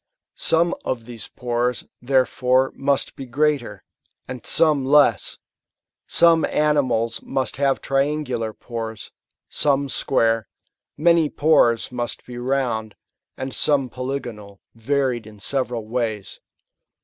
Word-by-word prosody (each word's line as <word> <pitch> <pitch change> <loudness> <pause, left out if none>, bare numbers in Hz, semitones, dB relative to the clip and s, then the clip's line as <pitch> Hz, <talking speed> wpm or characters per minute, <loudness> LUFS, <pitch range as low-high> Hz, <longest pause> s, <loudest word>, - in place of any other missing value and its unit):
Some 170 +1 +2
of 120 -3 -3
these 115 -3 -8
pores, 120 0 -2 0.2
therefore, 130 0 +2
must 140 0 0
be 135 - -8
greater, 145 0 0 0.4
and 125 -2 -7
some 155 -4 +3
less; 135 -6 +3 0.7
some 165 -1 +4
animals 130 -7 +1
must 130 -1 -2
have 140 -1 +1
triangular 135 -5 -1
pores, 115 -1 -7 0.4
some 140 -1 +1
square; 115 -5 +1 0.5
m2LViy 165 0 +3
pores 125 -8 +3
must 120 -1 -4
be 120 -1 -8
round, 120 -4 -1 0.4
and 130 0 -5
some 140 -4 +1
polygonal, 120 -6 -6
varied 125 -1 -1
in 105 -1 -13
several 125 -1 -2
ways. 110 -4 -3
130 Hz, 110 wpm, -22 LUFS, 115-140 Hz, 0.7 s, some